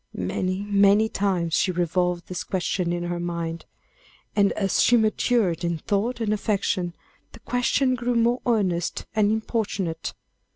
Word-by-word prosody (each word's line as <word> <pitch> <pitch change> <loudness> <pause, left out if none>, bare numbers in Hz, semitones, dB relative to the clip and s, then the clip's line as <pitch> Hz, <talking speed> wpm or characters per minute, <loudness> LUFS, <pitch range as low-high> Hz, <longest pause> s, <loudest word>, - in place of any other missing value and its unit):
Many, 185 - -2
many 205 +1 +4
times 185 -6 -1
she 185 - +2
revolved 180 0 0
this 180 - -4
question 180 -1 -1
in 175 0 -2
her 175 0 -3
mind. 170 -1 -4 0.7
And 200 -1 +4
as 195 -2 +1
she 240 - +5
matured 215 -5 +1
in 170 -1 0
thought 210 +9 -1
and 215 -2 0
affection, 195 -4 -1 0.4
the - - -12
question 250 +2 +1
grew 245 0 -1
more 235 +2 +2
earnest 185 -7 0
and 210 -1 +3
importunate. 205 -7 -2
195 Hz, 140 wpm, -24 LUFS, 175-220 Hz, 0.7 s, she